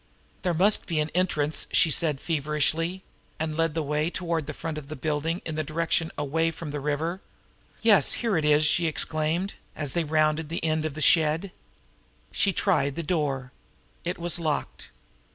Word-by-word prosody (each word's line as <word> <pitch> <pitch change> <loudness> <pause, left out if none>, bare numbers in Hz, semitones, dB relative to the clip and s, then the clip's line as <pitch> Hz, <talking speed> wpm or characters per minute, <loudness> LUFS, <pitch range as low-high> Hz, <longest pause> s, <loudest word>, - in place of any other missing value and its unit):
"There 180 -3 0
must 200 +5 +4
be 165 -3 0
an 150 +1 -1
entrance," 155 -4 +1
she 160 - +4
said 150 -3 +1
feverishly 160 +4 0 0.4
and 155 -1 -2
led 165 -1 0
the 160 - 0
way 150 +2 0
toward 170 -4 -2
the 155 - -4
front 160 -2 -4
of 140 - -12
the 155 - -6
building 155 +5 -2
in 160 - -4
the 155 0 -1
direction 165 +2 -1
away 160 +3 +1
from 165 -1 -7
the 145 - -3
river. 155 +6 -2 0.6
"Yes, 205 -10 +5
here 230 -4 0
it 160 - +1
is!" 150 0 +4
she 150 +3 +2
exclaimed, 160 +4 -1 0.2
as 145 -3 -1
they 170 - +1
rounded 155 0 +1
the 165 0 -3
end 155 0 +1
of 155 -3 -3
the 155 - -5
shed. 160 +5 +4 0.8
She 200 - +2
tried 175 -8 +1
the 170 - -3
door. 140 -6 -1 0.5
It 175 +2 -3
was 175 0 +1
locked. 155 -3 -3
160 Hz, 180 wpm, -26 LUFS, 150-170 Hz, 0.8 s, Yes